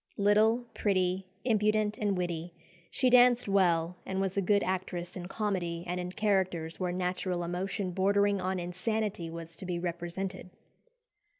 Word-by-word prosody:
Little, 215 Hz, +4 st, +3 dB
pretty, 185 Hz, -2 st, 0 dB, 0.2 s
impudent, 215 Hz, -2 st, +2 dB
and 205 Hz, -3 st, 0 dB
witty, 175 Hz, -1 st, -3 dB, 0.3 s
she 255 Hz, -, +2 dB
danced 245 Hz, -1 st, +6 dB
well, 180 Hz, -3 st, +2 dB
and 190 Hz, 0 st, -3 dB
was 195 Hz, -1 st, -1 dB
a 200 Hz, -, +2 dB
good 200 Hz, +2 st, +3 dB
actress 180 Hz, -1 st, -3 dB
in 180 Hz, -2 st, -6 dB
comedy 180 Hz, -5 st, -2 dB
and 180 Hz, 0 st, -3 dB
in 180 Hz, 0 st, -4 dB
characters 185 Hz, -6 st, 0 dB
where 180 Hz, -1 st, -1 dB
"natural 180 Hz, 0 st, -1 dB
emotion 185 Hz, +2 st, -2 dB
bordering 200 Hz, +2 st, +2 dB
on 185 Hz, 0 st, -1 dB
insanity" 180 Hz, 0 st, -2 dB
was 165 Hz, 0 st, -6 dB
to 190 Hz, -, -7 dB
be 175 Hz, -1 st, -1 dB
represented. 175 Hz, +2 st, -4 dB
185 Hz, 145 wpm, -30 LUFS, 175-205 Hz, 0.3 s, danced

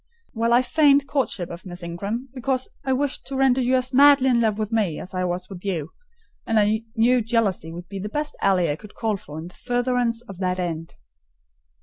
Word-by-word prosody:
"Well, 230 Hz, 0 st, 0 dB
I 245 Hz, +2 st, +5 dB
feigned 285 Hz, -1 st, +4 dB
courtship 255 Hz, -10 st, -2 dB
of 170 Hz, +1 st, -8 dB
Miss 175 Hz, -1 st, -8 dB
Ingram, 200 Hz, +10 st, -4 dB
because 260 Hz, 0 st, -1 dB
I 265 Hz, -, -1 dB
wished 270 Hz, +1 st, -1 dB
to 275 Hz, -, -5 dB
render 265 Hz, -1 st, +3 dB
you 255 Hz, +1 st, +2 dB
as 255 Hz, 0 st, -1 dB
madly 280 Hz, 0 st, +6 dB
in 240 Hz, -2 st, +3 dB
love 215 Hz, -2 st, +1 dB
with 215 Hz, 0 st, -3 dB
me 205 Hz, -9 st, 0 dB
as 185 Hz, -, -9 dB
I 185 Hz, 0 st, -1 dB
was 180 Hz, +1 st, -3 dB
with 185 Hz, -3 st, -10 dB
you; 175 Hz, -6 st, -3 dB, 0.5 s
and 225 Hz, -1 st, +2 dB
I 215 Hz, +2 st, +1 dB
knew 240 Hz, +2 st, +4 dB
jealousy 215 Hz, -7 st, 0 dB
would 175 Hz, +1 st, -8 dB
be 195 Hz, +1 st, -6 dB
the 210 Hz, +2 st, -4 dB
best 295 Hz, +4 st, -3 dB
ally 180 Hz, -5 st, +3 dB
I 145 Hz, -, -3 dB
could 210 Hz, +3 st, -14 dB
call 225 Hz, -1 st, -1 dB
in 205 Hz, -, -1 dB
for 150 Hz, -1 st, -9 dB
the 170 Hz, -, -8 dB
furtherance 245 Hz, -1 st, 0 dB
of 195 Hz, -6 st, -11 dB
that 185 Hz, -1 st, 0 dB
end." 165 Hz, -2 st, -4 dB
225 Hz, 220 wpm, -23 LUFS, 185-255 Hz, 0.5 s, madly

